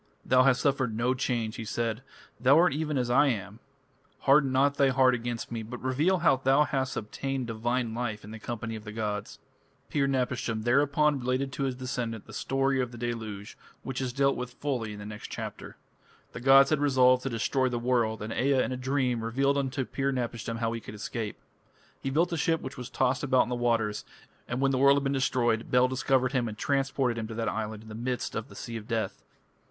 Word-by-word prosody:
"Thou 130 0 +5
hast 130 -1 +4
suffered 130 -6 +1
no 120 +2 +2
change," 120 -4 -2
he - - -4
said, 115 +1 -2 0.4
"thou 135 +4 +5
art 175 -1 +5
even 150 -1 -1
as 125 -1 0
I 145 +4 +5
am. 105 -3 -3 0.6
Harden 140 -1 +4
not 140 +2 +2
thy 140 -1 +4
heart 130 -1 +4
against 120 -1 -4
me, 115 -1 -3
but 120 +3 -7
reveal 145 +9 +1
how 150 -5 +5
thou 135 +3 +4
hast 135 -3 -2
obtained 135 +4 -3
divine 120 +1 -1
life 115 -3 -3
in 105 - -10
the 110 - -8
company 115 0 -5
of 110 - -8
the 105 - -7
gods." 105 -2 -4 0.5
Pir 140 -2 +2
napishtim 125 -4 -1
thereupon 140 +4 +3
related 130 +2 -1
to 135 +1 -2
his 130 -2 -2
descendant 125 -4 -4
the 110 - -13
story 135 +3 0
of 125 -1 -3
the 120 - -10
deluge, 110 -4 -5 0.3
which 130 0 -4
is 130 -2 -2
dealt 140 +2 +2
with 125 0 -5
fully 125 -7 -2
in - - -8
the 105 - -8
next 105 0 -7
chapter. - - -7 0.6
The - - -6
gods 135 +2 +6
had 155 - +3
resolved 130 -3 +4
to 135 - -3
destroy 130 +3 0
the 120 - -2
world, 120 -3 0
and 110 - -4
Ea 135 0 +2
in - - -3
a 130 - -2
dream 130 -3 0
revealed 135 +5 +1
unto 135 -1 -1
Pir 135 +2 -1
napishtim 115 -3 -3
how 115 -1 -1
he 115 0 -4
could 105 - -9
escape. 105 0 -4 0.6
He 135 - -2
built 165 +6 +1
a - - -1
ship 165 +1 +1
which 130 +1 -7
was 125 -1 -7
tossed 130 +1 +1
about 130 -3 +3
on - - -7
the - - -1
waters, 115 -3 0 0.4
and 125 +2 -2
when 135 0 +3
the 130 - 0
world 140 +1 +6
had 140 - 0
been 135 0 0
destroyed, 120 -4 +1
Bel 125 0 +4
discovered 130 0 +1
him 125 -3 0
and 105 -1 -6
transported 135 -3 0
him 110 - -4
to 110 - -7
that 115 -1 -2
island 110 0 -3
in 110 - -13
the - - -8
midst 125 +3 -3
of 115 - -4
the - - -13
Sea 115 -1 -6
of 110 -1 -9
Death. 115 -2 -2
125 Hz, 220 wpm, -28 LUFS, 115-135 Hz, 0.6 s, gods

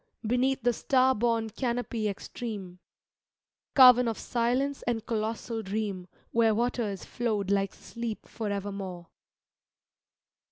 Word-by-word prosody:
Beneath 255 +3 +1
the 245 - +4
star^bome 235 -3 +2
canopy 235 -3 -1
extreme— 200 -3 -6 1.0
Carven 250 -2 +8
of 225 - -1
silence 250 +4 0
and 230 -2 -1
colossal 225 +1 -2
dream, 200 -3 -3 0.2
Where 225 -2 +3
waters 230 -4 -1
flowed 210 -5 -1
like 195 -1 +1
sleep 230 -2 -6
forevermore. 200 -5 -4
225 Hz, 95 wpm, -29 LUFS, 200-245 Hz, 1.0 s, Carven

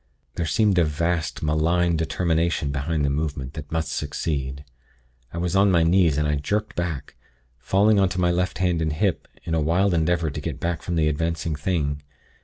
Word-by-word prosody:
There 85 - -2
seemed 100 +3 +3
a - - +5
vast, 80 0 -1
malign 85 +3 +2
determination 80 -2 0
behind 70 +2 -1
the 70 - +1
movement, 70 -2 -3
that 75 -2 -8
must 80 -1 -1
succeed. 70 -2 -3 0.7
I - - -7
was 90 +1 -1
on 100 +1 +5
my 85 -3 +4
knees, 85 -3 +3
and 75 0 +1
I 75 0 +1
jerked 105 +9 -2
back, 85 -6 -4 0.4
falling 100 - +3
on 95 -1 +3
to 90 - -4
my 90 -1 +3
left 90 +1 -1
hand, 90 -3 +1
and 80 -1 0
hip, 95 +2 -1 0.2
in 80 - -4
a 80 - +2
wild 90 +5 +2
endeavor 85 -1 +1
to - - -5
get - - -4
back 85 -1 -2
from 85 - -3
the 80 -2 +2
advancing 80 +1 -1
thing. 75 -2 -1
80 Hz, 195 wpm, -24 LUFS, 75-90 Hz, 0.7 s, a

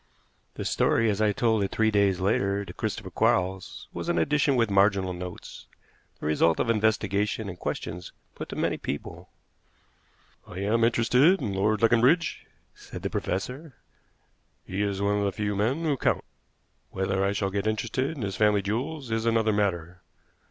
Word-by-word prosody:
The - - -5
story, 115 -1 +2
as 100 +1 -2
I 105 -1 +3
told 115 -2 +1
it 95 - -1
three 110 0 +2
days 100 -3 +2
later 100 +1 0
to - - -9
Christopher - - -4
Quarles, 95 +1 0
was - - -4
an - - +1
edition 145 -1 +2
with 115 -4 +1
marginal 100 -1 +3
notes, 90 0 -8 0.5
the - - -7
result 80 +2 +2
of 115 - +2
investigation 105 -1 0
and 90 -2 -7
questions 90 +1 -5 0.2
put - - -8
to - - -6
many - - 0
people. 70 - -6 1.2
"I 90 - -10
am 110 +3 +1
interested 125 +10 +4
in 100 - -3
Lord 105 +3 +1
Leconbridge," 125 +9 +3 0.3
said - - -10
the - - -2
professor; 130 - -4 0.9
"he 95 +2 -3
is 100 -1 -1
one 100 0 +1
of - - 0
the 100 - +1
few 105 0 -2
men 120 +11 0
who 150 -3 +1
count. - - 0 0.7
Whether 95 0 -1
I 100 - +2
shall 100 -1 -1
get 100 +1 -2
interested 115 +4 -1
in 125 - -4
his 100 -1 -3
family 105 -2 +3
jewels 130 +5 -3
is 115 +1 0
another 110 -1 +2
matter. 95 -3 -1
105 Hz, 170 wpm, -26 LUFS, 95-115 Hz, 1.2 s, interested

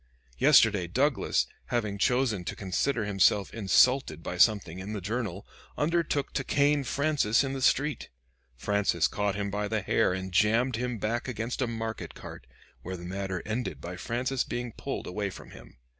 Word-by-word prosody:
Yesterday 100 -6 +5
Douglas, 130 - +1 0.2
having 105 -4 -2
chosen 125 -5 +1
to - - -4
consider 110 +5 -1
himself 100 0 +2
insulted 110 - +3
by - - -4
something 95 -3 +3
in 100 +3 -6
the 105 - -3
'Journal,' 100 -1 -4 0.3
undertook 155 -2 0
to 135 - -1
cane 145 +1 +2
Francis 140 -4 +1
in 135 -1 -3
the 135 - -4
street. 145 +3 +1 0.5
Francis 100 +2 +1
caught 105 -1 -1
him 100 0 -3
by 105 +1 -2
the 110 -1 -1
hair 100 - +2
and 95 +1 -4
jammed 115 +6 +3
him 125 0 -2
back 115 +4 -2
against 120 0 -3
a 130 - +1
market 115 -1 -5
cart, 60 - -10 0.3
where 95 +1 -6
the 85 - -9
matter 95 0 -4
ended 110 0 -3
by 90 +1 -7
Francis 125 +7 -1
being 120 0 -4
pulled - - -5
away 100 +2 -3
from - - -11
him. - - -14
110 Hz, 170 wpm, -28 LUFS, 95-125 Hz, 0.5 s, Yesterday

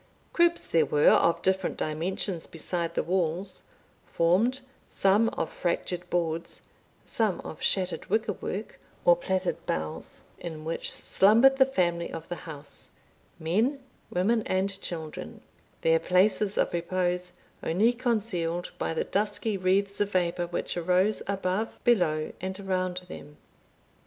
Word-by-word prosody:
Cribs 345 0 +3
there 160 -2 +3
were 150 0 +5
of 170 - +3
different 190 0 +1
dimensions 165 +3 -2
beside 170 +1 -4
the - - +1
walls, 180 +1 -1 0.5
formed, 210 +11 +2 0.3
some 205 +4 +3
of - - -3
fractured 175 0 -2
boards, 170 -1 -2 0.4
some 220 -7 0
of 155 - -9
shattered 185 -2 0
wicker 220 -1 +1
work 200 +3 -6 0.3
or 175 - +7
plaited 185 +1 -2
boughs, 80 0 -3 0.2
in 155 -2 -7
which 165 +1 0
slumbered 230 +7 +5
the 265 -1 +6
family 175 -8 0
of 165 0 -7
the 175 - -2
house, 145 -2 -10 0.5
men, 215 - +1 0.3
women, 220 +6 +2
and 195 +1 0
children, 160 -3 -6 0.4
their 165 0 +4
places 195 +4 +2
of - - +1
repose 180 +1 -1 0.3
only 210 +9 +2
concealed 205 -8 -1
by 165 - -1
the - - +1
dusky 210 +1 -1
wreaths 195 +2 +1
of 205 - +1
vapour 175 -1 +1
which 170 - -3
arose 180 +4 +2
above, 195 +2 -1
below, 170 -10 +2
and 190 +1 -4
around 185 -2 -1
them. 150 -4 -10
185 Hz, 130 wpm, -28 LUFS, 170-205 Hz, 0.5 s, or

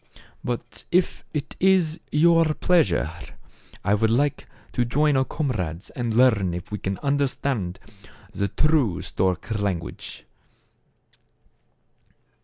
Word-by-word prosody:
But 120 -1 -4
if 180 0 +1
it 150 -1 -4
is 180 -4 +3
your 165 0 +4
pleasure, 100 - +2 0.7
I 105 - +2
would 110 +1 +2
like 140 +5 +1 0.2
to 125 - +1
join 145 +5 +2
our 130 - +4
comrades 95 - -3
and 120 -3 -2
learn 110 -8 +4
if 90 - -7
we 105 - -3
can 95 0 -3
under 140 0 +2
stand 110 -10 -2 0.6
the 100 -1 0
true 145 - +1
stork 95 +4 -1
language." 95 -5 -4
125 Hz, 115 wpm, -24 LUFS, 100-150 Hz, 0.7 s, your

